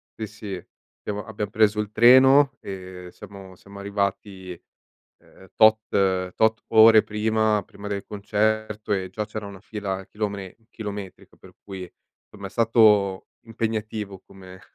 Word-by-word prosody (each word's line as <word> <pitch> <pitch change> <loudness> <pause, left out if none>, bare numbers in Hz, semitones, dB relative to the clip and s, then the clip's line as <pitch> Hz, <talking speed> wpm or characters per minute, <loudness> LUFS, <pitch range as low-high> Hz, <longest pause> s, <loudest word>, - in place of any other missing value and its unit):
Sì, 110 - -5
sì, 100 -4 -8 0.3
abbiamo 105 0 -5
abbiam 105 -2 -5
preso 105 0 +2
il 105 -1 -3
treno 130 +3 +6
e 90 -2 -9
siamo 95 -2 -12
siamo 100 +2 -14
arrivati, 100 -2 -4 0.6
uhm, 95 - -20
tot 110 0 +6 0.5
tot 110 0 +1
ore 110 -1 +7
prima 110 0 0
prima 105 0 -10
del 100 -1 -4
concerto 105 +1 -2
e 95 -2 -2
già 105 +2 -4
c'era 105 -1 -7
una 100 -1 -10
fila 100 -3 -5
chilome 100 -3 -5
chilometrica, 105 -3 -8
per - - -17
cui 95 -2 -8 0.4
insomma 100 -1 -11
è - - -9
stato 105 -4 +3
impegnativo 110 -3 -4
come 95 -1 -14
105 Hz, 135 wpm, -24 LUFS, 100-110 Hz, 0.6 s, ore